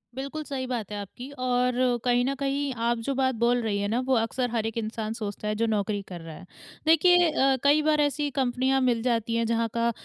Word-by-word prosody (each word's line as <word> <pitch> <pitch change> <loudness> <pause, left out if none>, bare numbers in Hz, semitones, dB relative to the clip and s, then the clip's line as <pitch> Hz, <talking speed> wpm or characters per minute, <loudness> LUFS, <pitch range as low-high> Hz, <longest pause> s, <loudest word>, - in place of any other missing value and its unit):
बिल्कुल 275 +4 -5
सही 270 -3 -4
बात 235 -5 -4
है 210 - -4
आपकी 245 +6 -9
और 250 0 +1 0.3
कहीं 245 0 +2
न 275 - 0
कहीं 280 0 -1
आप 235 0 +1
जो 275 - 0
बात 260 -1 +1
बोल 240 +2 +2
रही 210 -3 -1
है 205 - -1
ना 225 +4 0
वो 265 - +3
अक्सर 245 +2 0
हर 225 -2 -1
एक 225 0 -4
इंसान 220 -1 -3
सोचता 210 -2 -5
है 210 - -1
जो 230 +2 0
नौकरी 205 -1 -1
कर 175 -2 -8
रहा 165 -1 -9
है। 180 - -12 0.4
देखिए 350 +2 +5
अ, 270 -3 +3
कई 290 +2 +5
बार 305 0 +2
ऐसी 290 0 0
कंपनियाँ 260 0 +1
मिल 245 -3 +2
जाती 230 -2 0
हैं 230 0 +1
जहाँ 230 0 +1
का 235 0 +1
245 Hz, 235 wpm, -26 LUFS, 225-270 Hz, 0.4 s, देखिए